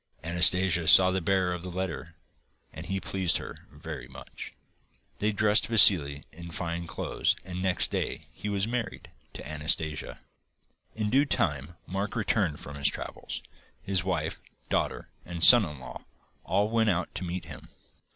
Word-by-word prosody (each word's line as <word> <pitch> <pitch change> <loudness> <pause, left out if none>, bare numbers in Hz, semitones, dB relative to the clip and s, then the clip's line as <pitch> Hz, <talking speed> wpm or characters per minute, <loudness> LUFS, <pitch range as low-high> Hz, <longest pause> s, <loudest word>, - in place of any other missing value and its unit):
Anastasia 90 0 +3
saw 95 +3 +8
the 95 0 -1
bearer 90 +1 +1
of 90 - -6
the 90 - -6
letter 85 -2 -5 0.6
and - - -9
he 95 +2 -2
pleased 95 -3 0
her - - -10
very 75 -3 -8
much. 65 0 -10 0.7
They 105 +1 +1
dressed 105 +1 +2
Vassili 80 -10 +5
in 85 +2 -10
fine 85 +1 -4
clothes 70 - -1
and 90 0 -6
next 95 -2 +2
day - - -3
he 105 - -6
was 100 0 -1
married 120 -2 -5 0.2
to - - -9
Anastasia. 75 0 -1 0.8
In 105 -1 -2
due 140 +3 +4
time, 75 - -1
Mark 100 +4 -4
returned 100 -8 0
from 70 +1 -9
his 70 0 +2
travels. - - -7 0.4
His 95 -2 0
wife, 90 -2 -3 0.3
daughter, - - -2
and 85 -1 -6
son 120 0 +9
in 75 -4 -8
law 65 - -10 0.4
all 100 +4 0
went 115 -1 +2
out 95 -2 -1
to - - -5
meet 90 +1 -5
him. - - -11
90 Hz, 160 wpm, -28 LUFS, 80-100 Hz, 0.8 s, son